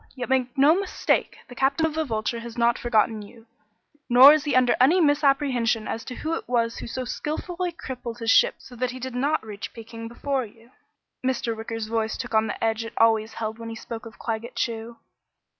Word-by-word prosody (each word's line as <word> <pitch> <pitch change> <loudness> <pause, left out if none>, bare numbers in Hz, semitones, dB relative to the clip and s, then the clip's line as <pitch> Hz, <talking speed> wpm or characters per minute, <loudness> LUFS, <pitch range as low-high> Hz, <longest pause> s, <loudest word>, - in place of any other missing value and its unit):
Yet 250 -2 -5
make 255 -1 0
no 285 +3 +6
mistake 400 -2 0
the - - -11
Captain 275 +5 +1
of 320 - -1
the 320 +1 0
Vulture 230 -3 -2
has 235 0 -9
not 235 0 +2
forgotten 220 -2 +1
you. 225 +2 -14 0.6
Nor 255 +4 +9
is 310 -1 0
he 290 - 0
under 250 -1 +4
any 315 +9 +5
misapprehension 275 -7 +2
as 230 - -4
to 250 - -6
who 315 +5 -3
it 330 - -5
was 230 -2 +1
who - - -7
so 255 +2 -4
skillfully 345 +7 -3
crippled 250 -7 -7
his 230 -1 +1
ship - - +5
so 250 - -14
that 250 +1 -1
he 255 +1 -7
did 260 0 -5
not 280 +1 0
reach 210 -1 -7
Peking 230 0 -9
before 265 +3 -2
you." 230 +2 -15 0.5
Mr. 240 -3 -1
Wicker's 225 0 -5
voice 220 0 -2
took 245 -2 -6
on 220 0 +3
the - - -5
edge 225 0 0
it 230 - -8
always 225 -1 +3
held 220 0 -4
when 230 0 -7
he 225 - -6
spoke 225 0 -7
of 225 - -14
Claggett 230 +1 -4
Chew. 230 0 -3
240 Hz, 210 wpm, -25 LUFS, 225-265 Hz, 0.6 s, Nor